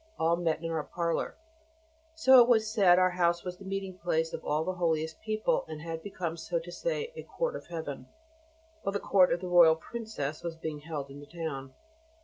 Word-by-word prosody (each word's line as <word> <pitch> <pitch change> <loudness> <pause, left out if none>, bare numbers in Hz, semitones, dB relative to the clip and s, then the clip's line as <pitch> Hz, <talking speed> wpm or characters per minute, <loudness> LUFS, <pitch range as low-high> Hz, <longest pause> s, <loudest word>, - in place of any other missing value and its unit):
all 165 +1 +3
met 165 -1 -1
in 165 - -2
our 160 -2 -1
parlour, 170 0 -2 0.8
so 265 -5 +7
that - - +11
it 235 - +5
was 220 -3 +4
said 190 -5 +6
our 185 0 +4
house 170 -1 +1
was 180 -1 -5
the - - -10
meeting 195 -1 -4
place 160 -1 0
of - - -5
all 150 +2 0
the 185 - -2
holiest 160 -3 -1
people, 215 +3 0
and 155 -1 -7
had 165 -1 -5
become, 175 -3 -4
so 170 +1 -3
to 170 +1 -6
say, - - -3
a - - -6
court - - -3
of - - -8
Heaven, 155 -6 -6 0.7
while 195 - -2
the 200 - 0
court 185 -3 +4
of 170 - 0
the 185 - -4
Royal 170 -2 +7
Princess 160 -6 -5
was 170 -1 -4
being 160 -2 -5
held 145 -3 -6
in 140 - -10
the 145 - -12
town. 145 -5 -6
170 Hz, 215 wpm, -30 LUFS, 160-195 Hz, 0.8 s, that